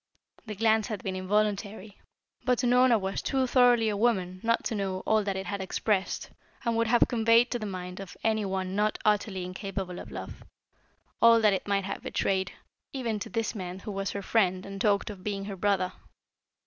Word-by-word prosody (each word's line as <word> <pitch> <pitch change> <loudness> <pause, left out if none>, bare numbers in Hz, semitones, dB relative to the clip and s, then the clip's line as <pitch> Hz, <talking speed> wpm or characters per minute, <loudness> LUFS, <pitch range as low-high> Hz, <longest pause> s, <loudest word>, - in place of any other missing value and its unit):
The 210 - -5
glance 220 0 +2
had 215 -4 -5
been 190 -1 -3
involuntary, 205 +1 -1 0.4
but 250 0 +1
Unorna 250 -1 +5
was 190 0 -3
too 265 -1 +1
thoroughly 245 -3 +4
a 210 - 0
woman 190 -5 0
not 230 0 +1
to - - -2
know 195 -3 -2
all 220 -1 +2
that 195 -1 -2
it 190 0 -4
had 200 +1 -3
expressed 195 +1 -1 0.3
and 235 -1 +1
would 230 0 +1
have 240 +1 +4
conveyed 230 +1 +4
to 240 - -1
the 215 - -4
mind 180 -1 -6
of 195 -2 -9
any 220 -1 +1
one 190 -1 -2
not 210 +1 +1
utterly 205 -3 +1
incapable 185 -1 -5
of - - -9
love, - - -8 0.8
all 230 0 +7
that 210 -2 +5
it 190 - -3
might 200 -1 +1
have - - -4
betrayed 190 -1 -1 0.4
even 235 -6 -2
to - - -6
this 225 +3 -2
man 185 -4 -5
who 200 +2 -7
was 195 -1 -2
her 200 - -4
friend 185 -3 +1
and 195 0 -7
talked 205 0 +2
of 190 -3 -11
being 200 -1 -3
her 200 -1 -5
brother. 185 -1 0
205 Hz, 200 wpm, -28 LUFS, 190-225 Hz, 0.8 s, all